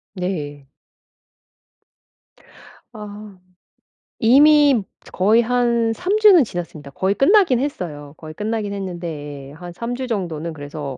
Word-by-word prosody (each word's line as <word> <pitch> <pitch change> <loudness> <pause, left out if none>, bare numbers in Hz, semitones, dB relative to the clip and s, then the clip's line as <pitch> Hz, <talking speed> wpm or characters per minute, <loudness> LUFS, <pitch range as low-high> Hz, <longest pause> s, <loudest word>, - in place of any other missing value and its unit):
네. 145 -7 -5 2.2
아. 210 -2 -10 0.8
이미 280 0 +5 0.3
거의 215 +5 +3
한 235 -1 +1
3 375 - -1
주는 395 -8 +7
지났습니다. 170 -7 -7
거의 190 +7 -1
끝나긴 340 - +4
했어요. 155 - -5
거의 155 -1 -10
끝나긴 210 +2 -3
했는데 160 -7 -7
예 - - -13
한 175 +2 -10
3 235 +5 -5
주 260 0 -5
정도는 170 -7 -4
그래서 145 -2 -7
200 Hz, 215 characters per minute, -20 LUFS, 155-245 Hz, 2.2 s, 주는